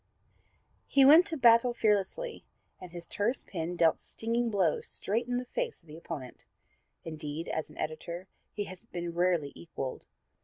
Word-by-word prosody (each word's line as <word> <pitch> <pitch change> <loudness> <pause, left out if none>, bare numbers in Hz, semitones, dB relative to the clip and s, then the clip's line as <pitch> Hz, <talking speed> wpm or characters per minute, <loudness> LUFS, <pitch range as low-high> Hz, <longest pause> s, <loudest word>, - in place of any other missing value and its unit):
He 275 -1 +5
went 320 +7 +8
to 325 - -3
battle 240 -1 +5
fearlessly, 220 - 0 0.4
and 180 - -10
his 170 -1 -7
terse 225 +9 -1
pen 175 -1 -4
dealt 165 -2 +3
stinging 230 +1 -1
blows 190 -7 +1
straight 230 +4 -1
in 245 0 0
the 250 - -3
face 475 - -3
of - - -30
the 155 -1 -11
opponent. 155 -6 -7 0.6
Indeed, 155 0 -5
as 160 - -3
an 150 - -15
editor 170 +4 -5 0.2
he 205 - -3
has 185 -2 -9
been 175 -6 -5
rarely 175 -4 +1
equaled. 135 -6 -6
185 Hz, 160 wpm, -30 LUFS, 165-235 Hz, 0.6 s, went